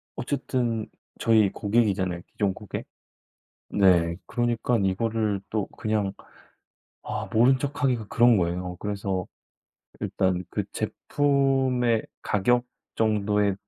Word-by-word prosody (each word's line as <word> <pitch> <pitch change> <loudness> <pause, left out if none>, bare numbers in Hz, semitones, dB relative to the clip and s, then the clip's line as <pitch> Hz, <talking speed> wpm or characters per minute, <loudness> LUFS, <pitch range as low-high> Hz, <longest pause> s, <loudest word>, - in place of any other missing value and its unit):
어쨌든 120 -4 -1 0.3
저희 110 -3 +4
고객이잖아요 100 -5 0
기존 100 -2 0
고객. 105 -1 -7 0.9
네 85 -4 +4
그러니깐 120 -2 0
이거를 105 +1 0
또 110 -3 -1
그냥 105 -3 0 0.9
아 - - -4
모른 125 +4 +5
척하기가 135 -5 -1
그런 120 0 +5
거예요. 90 +1 -2
그래서 100 -3 -2 0.7
일단 95 -1 0
그 - - -2
제품의 135 -5 +1 0.2
가격 120 +5 +2 0.3
정도에 105 -2 +2
110 Hz, 230 characters per minute, -26 LUFS, 95-120 Hz, 0.9 s, 모른